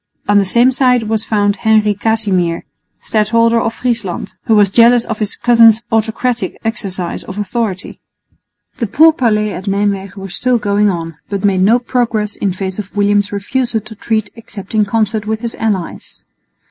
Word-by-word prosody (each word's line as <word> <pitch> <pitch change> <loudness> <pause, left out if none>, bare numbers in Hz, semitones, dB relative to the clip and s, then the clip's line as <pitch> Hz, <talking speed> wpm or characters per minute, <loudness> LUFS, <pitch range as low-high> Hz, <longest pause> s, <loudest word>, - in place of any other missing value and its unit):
On 205 0 +4
the 200 - +1
same 240 +6 +3
side 250 -2 +2
was 220 0 -1
found 205 -2 +1
Henry 215 0 +2
Casimir, 200 -5 -1 0.4
Stadholder 230 +1 +2
of 225 - -2
Friesland, 230 -9 -3
who 225 - +3
was 205 -2 +4
jealous 235 +2 +5
of 220 -2 -4
his 210 -2 -2
cousin's 230 -2 +5
autocratic 225 +2 -1
exercise 190 -6 -3
of 200 -3 -9
authority. 205 -2 -3 0.8
The 230 - -2
pourparlers 235 -7 +3
at 185 +2 -7
Nijmwegen 200 -1 -2
were 195 0 -7
still 250 +6 0
going 205 -1 +1
on, 165 -4 -4
but 200 -1 -2
made 190 -2 +2
no 215 +6 +4
progress 235 -4 -1
in 200 - -1
face 190 +1 -4
of 205 0 -7
William's 205 0 +1
refusal 225 +4 -2
to 215 +2 -12
treat 220 0 -2
except 215 -3 -9
in 215 -1 +2
concert 215 0 -1
with 220 0 -2
his 235 -1 -3
allies. 205 -6 -4
215 Hz, 165 wpm, -15 LUFS, 200-230 Hz, 0.8 s, jealous